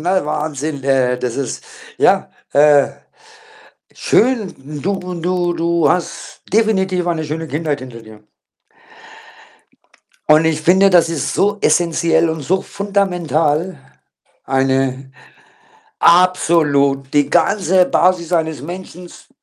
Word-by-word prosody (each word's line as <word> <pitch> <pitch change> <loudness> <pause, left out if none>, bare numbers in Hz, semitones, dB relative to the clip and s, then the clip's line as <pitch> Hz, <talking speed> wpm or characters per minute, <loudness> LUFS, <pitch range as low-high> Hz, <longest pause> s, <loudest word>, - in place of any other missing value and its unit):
Ne, 180 +1 0
Wahnsinn! 150 -1 -4
Äh, 130 -2 +1
das 125 -2 -4
ist 135 -4 -5 0.3
ja, - - +2 0.2
äh 145 -1 +5 1.1
schön. 225 -6 0 0.3
Du 185 0 -3
du 175 +1 -1
du 170 -2 +1
hast 175 +3 -4
definitiv 190 -5 +1
eine 165 -2 -1
schöne 160 +2 -5
Kindheit 150 -1 -3
hinter 125 -3 -10
dir. 110 -1 -16 2.0
Und 155 +1 +5
ich 160 -1 0
finde, 190 +4 +4
das 170 -2 +4
ist 160 -5 -3
so 205 +1 +1
essenziell 165 -1 +1
und 160 -1 -5
so 190 +7 -1
fundamental 180 -5 -1 0.7
eine 135 0 -1 0.9
absolut! 155 -6 +2
Die 145 -1 +2
ganze 185 +1 +2
Basis 180 -2 +1
eines 160 -5 -1
Menschens 180 +2 -10
165 Hz, 110 wpm, -17 LUFS, 145-180 Hz, 2.0 s, äh